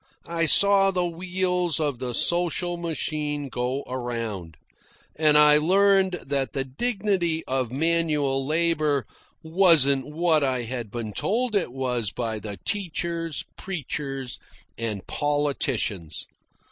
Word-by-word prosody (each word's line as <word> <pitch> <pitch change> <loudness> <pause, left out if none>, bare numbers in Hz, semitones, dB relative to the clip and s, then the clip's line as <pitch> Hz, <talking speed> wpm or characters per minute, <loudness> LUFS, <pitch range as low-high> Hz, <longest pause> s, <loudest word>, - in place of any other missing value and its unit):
I 165 -1 0
saw 200 +3 +6
the 180 -2 0
wheels 180 -1 -1
of 145 -5 -1
the 125 -2 -3
social 175 0 +1
machine 150 -4 -3
go 125 +3 -2
around, 115 - -5 0.6
and 155 -1 +4
I 150 0 +7
learned 190 +3 +4
that 135 -1 -1
the 135 - -1
dignity 180 - -1
of 130 -3 -1
manual 150 -2 +1
labour 155 -3 +1 0.4
wasn't 160 -6 +4
what 160 0 +2
I 130 -3 0
had 120 -2 -5
been 110 -1 -5
told 235 - 0
it 200 -10 0
was 125 -4 -2
by 110 0 -3
the 105 -1 -7
teachers, 170 -4 -2
preachers, 135 - -5 0.4
and 110 -4 -4
politicians. 140 - -1
150 Hz, 120 wpm, -25 LUFS, 130-170 Hz, 0.6 s, I